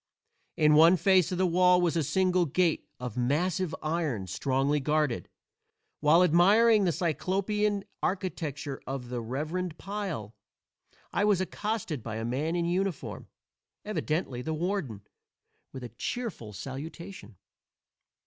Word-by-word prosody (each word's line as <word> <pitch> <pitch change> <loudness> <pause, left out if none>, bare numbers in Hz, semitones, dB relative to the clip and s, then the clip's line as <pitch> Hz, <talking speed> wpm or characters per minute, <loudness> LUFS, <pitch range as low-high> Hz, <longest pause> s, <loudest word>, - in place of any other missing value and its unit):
In 150 -1 +5
one 165 +4 +7
face 190 -2 +3
of 180 - -2
the 185 - +2
wall 180 +1 +4
was 175 -2 +1
a 165 - +2
single 180 +3 +2
gate 170 +3 +1
of 125 -3 -5
massive 160 +7 0
iron, 155 - -1
strongly 135 - 0
guarded. 150 -2 0 0.7
While 155 +4 +5
admiring 200 +6 +5
the 175 - +3
Cyclopean 200 +5 0 0.2
architecture 155 -7 -3
of 130 -2 -5
the 125 -1 -3
"reverend 155 +8 -3
pile" 190 - -5 0.8
I 200 - +1
was 205 -3 +3
accosted 190 - -3
by 110 0 -5
a 110 0 -3
man 145 +8 -1
in 170 -1 0
uniform, 180 -1 -2 0.6
evidently 155 -10 -2
the 160 +5 -3
warden, 170 - -2 0.7
with 130 - -8
a 120 - -6
cheerful 170 - -5
salutation. 135 - -8
165 Hz, 130 wpm, -29 LUFS, 135-185 Hz, 0.8 s, one